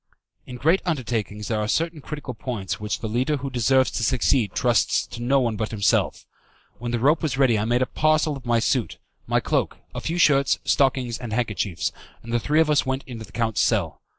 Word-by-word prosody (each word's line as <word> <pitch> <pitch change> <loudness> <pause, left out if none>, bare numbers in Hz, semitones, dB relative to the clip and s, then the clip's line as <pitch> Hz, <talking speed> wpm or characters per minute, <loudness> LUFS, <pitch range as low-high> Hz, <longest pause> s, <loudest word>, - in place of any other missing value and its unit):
In 125 - -7
great 165 +9 +2
undertakings 115 - -2
there 110 -2 -1
are 105 - -1
certain 165 +5 -1
critical 145 -3 -6
points 110 -4 -4
which 105 0 -3
the 110 - -3
leader 130 +7 0
who 135 0 -5
deserves 130 +2 +3
to 115 - -2
succeed 120 -2 +2
trusts 120 -5 +2
to 120 - -9
no 135 +3 +3
one 120 -4 0
but 110 0 -2
himself. 100 -3 +1 0.5
When 120 - -4
the 120 - 0
rope 145 +7 +3
was 155 -4 -1
ready 125 -6 +3
I 105 - -1
made 120 +2 +2
a - - 0
parcel 155 +1 +1
of 135 - -10
my 120 -1 +2
suit, 115 0 0 0.3
my - - +2
cloak, - - -1 0.2
a - - -5
few 165 - -2
shirts, 140 -5 +4
stockings, 130 -4 +1
and 120 -4 -6
handkerchiefs, 105 -6 -1 0.3
and 115 +1 -7
the 120 - +3
three 150 +6 +1
of 155 -1 +2
us 145 - +3
went 130 +1 -2
into 115 -3 -8
the - - -19
count's 115 -3 0
cell. - - 0
125 Hz, 215 wpm, -24 LUFS, 115-140 Hz, 0.5 s, shirts